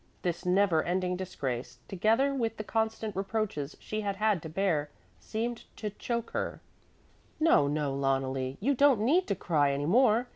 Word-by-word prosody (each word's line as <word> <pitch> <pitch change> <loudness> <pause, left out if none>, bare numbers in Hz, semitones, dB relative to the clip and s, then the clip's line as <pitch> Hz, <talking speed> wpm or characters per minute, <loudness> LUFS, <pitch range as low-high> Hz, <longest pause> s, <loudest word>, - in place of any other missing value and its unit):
This 175 -1 -2
neverending 180 -1 +2
disgrace, 130 -9 -4
together 225 +9 +2
with 230 -4 -1
the 215 - -4
constant 220 -1 -2
reproaches 195 -7 -2
she 215 0 -4
had 200 -1 -2
had 210 -3 +1
to 160 - -7
bear, 160 -4 0 0.3
seemed 230 +2 -4
to 210 -2 -4
choke 235 +3 -3
her, - - -3 0.8
"No, 310 - +5
no, 145 -1 -1
Loneli, 135 -1 -1
you 270 +8 +2
don't 275 -4 +4
need 325 - +3
to 200 - 0
cry 150 -5 +2
any 140 +1 -1
more. 230 - +4
195 Hz, 155 wpm, -30 LUFS, 150-225 Hz, 0.8 s, No